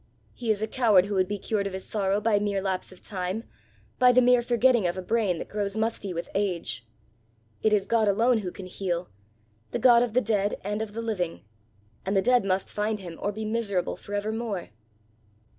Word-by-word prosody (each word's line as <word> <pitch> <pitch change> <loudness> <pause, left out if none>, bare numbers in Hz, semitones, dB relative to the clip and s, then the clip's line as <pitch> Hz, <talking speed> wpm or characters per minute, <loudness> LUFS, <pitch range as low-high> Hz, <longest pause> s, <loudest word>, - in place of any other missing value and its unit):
He 240 -2 -5
is 215 -1 +1
a - - 0
coward 215 -6 +4
who 205 - -4
would 185 -1 +2
be 205 - -2
cured 200 0 -1
of 195 - -6
his 190 0 -5
sorrow 200 -1 0
by 210 -1 +2
mere 205 -1 0
lapse 190 -1 -2
of 185 - -14
time, 190 +2 -3 0.6
by 250 0 +7
the 250 - +5
mere 250 -1 +5
forgetting 240 -3 +3
of 175 - -2
a - - -2
brain 210 -4 +1
that - - -6
grows 205 0 -3
musty 220 -3 -1
with 170 -1 -4
age. 170 - -2 0.7
It 220 - +3
is 205 -2 +3
God 225 -2 +2
alone 230 +4 +3
who 185 -4 -4
can 190 - -9
heal 180 -1 -3 0.6
the - - -2
God 235 0 +6
of 240 -3 0
the - - +6
dead 205 -3 0
and 210 +2 -2
of 215 -2 -5
the 230 +1 -4
living! 185 -7 -2 0.6
and 195 +1 0
the - - +4
dead 250 -2 +4
must 190 0 -1
find 210 +1 -1
him, 175 -4 -9
or 205 - 0
be 215 +1 -5
miserable 215 -4 -1
for 205 - -7
evermore!" 215 -2 -3
205 Hz, 210 wpm, -27 LUFS, 190-225 Hz, 0.7 s, by